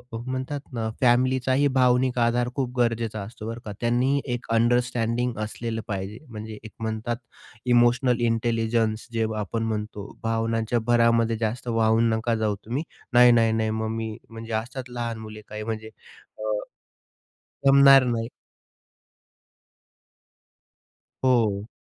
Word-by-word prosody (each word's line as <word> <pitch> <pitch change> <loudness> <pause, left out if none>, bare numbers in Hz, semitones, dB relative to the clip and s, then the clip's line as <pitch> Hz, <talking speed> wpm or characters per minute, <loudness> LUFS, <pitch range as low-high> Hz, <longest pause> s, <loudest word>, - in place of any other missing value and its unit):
अ, - - -2
म्हणतात 130 +2 -3
ना 115 -2 -2
फॅमिलीचाही 130 +2 +3
भावनिक 125 0 +3
आधार 120 +1 +2
खूप 125 -2 -3
गरजेचा 115 -3 0
असतो, 110 +2 -8
बरं 115 +1 -5
का. 105 - -5
त्यांनी 125 +4 +2
एक 120 - -4
अंडरस्टँडिंग 120 +1 +1
असलेलं 115 +1 -4
पाहिजे, 100 +1 -4
म्हणजे 110 -1 -7
एक 110 - -10
म्हणतात, 110 +1 -2 0.5
इमोशनल 120 0 +3
इंटेलिजन्स 115 -1 0
जे 115 -1 +1
आपण 110 +2 -2
म्हणतो, 105 -2 -4
भावनांच्या 115 +1 0
भरामध्ये 115 -1 +3
जास्त 115 +3 -3
वाहून 115 0 +3
नका 115 +1 0
जाऊ 110 -2 0
तुम्ही. 125 +7 -2 0.3
नाही-नाही-नाही, 115 -2 +5
मग 110 0 -2
मी 110 -1 -4
म्हणजे 115 0 -8
असतात 125 +3 -4
लहान 120 -2 -4
मुले 110 -1 -9
काही, 105 0 -6
म्हणजे 110 0 -5 0.5
अ, - - -11 1.3
जमणार 135 -1 +8
नाही. 115 -2 -1 3.0
हो. 110 -5 +2
115 Hz, 120 wpm, -25 LUFS, 110-120 Hz, 3.0 s, जमणार